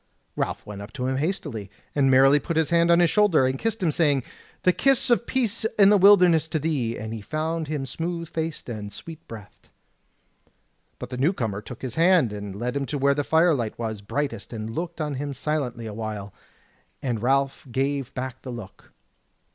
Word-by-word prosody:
Ralph - - -3
went 100 -1 -8
up 100 +2 -9
to 130 -3 -3
him 130 0 0
hastily, 140 - -3 0.2
and 140 -2 +3
merrily 135 +2 +6
put 165 +2 -3
his 160 -1 +1
hand 170 0 +4
on 170 0 +6
his 170 -3 +4
shoulder, 205 -10 +4
and 130 +1 -1
kissed 225 -2 -2
him, 165 - +3
saying: 145 -4 +2 0.4
"The 180 - +4
kiss 265 +6 +2
of 235 0 +2
peace 235 -4 0
in 200 -1 +7
the 210 - +6
wilderness 180 -5 +6
to 160 - -1
thee!" 140 -7 -1
And 110 +1 -5
he 110 - -6
found 155 +6 -2
him 145 -2 -3
smooth 170 +4 -4
faced 160 -1 -4
and 105 -4 -6
sweet 165 +6 -8
breathed. 105 -3 -12 1.3
But - - -8
the 125 - -4
new 145 +9 +2
comer 110 - -3
took 120 +3 -10
his 130 -3 -4
hand 165 - +4
and 100 -2 -6
led 120 +5 -3
him 140 -1 -1
to 145 - -2
where 140 0 +3
the 145 +1 -1
firelight 160 -8 +2
was 110 -3 -4
brightest 115 0 -3
and 110 -1 -5
looked 170 +2 -4
on 150 -2 -2
him 145 -1 -4
silently 130 -5 -2
a 110 - -6
while; 105 -2 -5 0.7
and 120 -5 -1
Ralph 135 +3 0
gave 135 +1 -1
back 130 0 -5
the 130 - -8
look. 115 -6 -10
140 Hz, 200 wpm, -25 LUFS, 115-165 Hz, 1.3 s, in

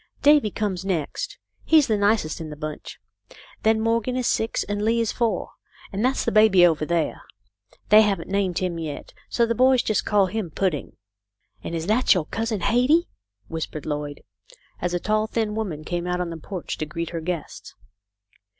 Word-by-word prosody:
Davy 290 -6 +5
comes 195 -3 -3
next. 195 - -3 0.3
He's 315 -3 +5
the 220 - +1
nicest 200 -6 +1
in 160 - -6
the 150 - -7
bunch. 155 0 -7 0.6
Then 220 0 +3
Morgan 230 +3 0
is 250 - -1
six, 225 0 0
and 205 0 -3
Lee 230 +2 +2
is 230 -2 0
four, 225 -6 -1 0.4
and 200 +3 -1
that's 260 +2 +1
the - - +1
baby 210 -4 +6
over 155 -3 +1
there. 170 -2 -1 0.7
They 215 +1 +8
haven't 195 -6 0
named 190 -3 0
him 180 -2 -2
yet, 150 -3 -6 0.2
so 235 - +2
the 230 - 0
boys 255 +1 +4
just 215 - 0
call 205 -2 +3
him 205 -1 -3
Pudding." 165 -2 -2 0.7
"And 170 - -4
is 165 0 -3
that 220 +3 +4
your 175 -4 0
cousin 225 0 -3
Hetty?" 250 - +3 0.4
Whispered 160 -2 -5
Lloyd, 145 -1 -4 0.6
as 175 0 -1
a - - 0
tall, 215 +3 0
thin 220 -2 -1
woman 190 -9 -4
came 175 +2 -3
out 180 0 -1
on 175 -1 -2
the 165 - -6
porch 180 +2 -6
to 155 - -2
greet 165 +2 -4
her 165 -1 -4
guests. 170 -2 -5
200 Hz, 185 wpm, -24 LUFS, 170-225 Hz, 0.7 s, They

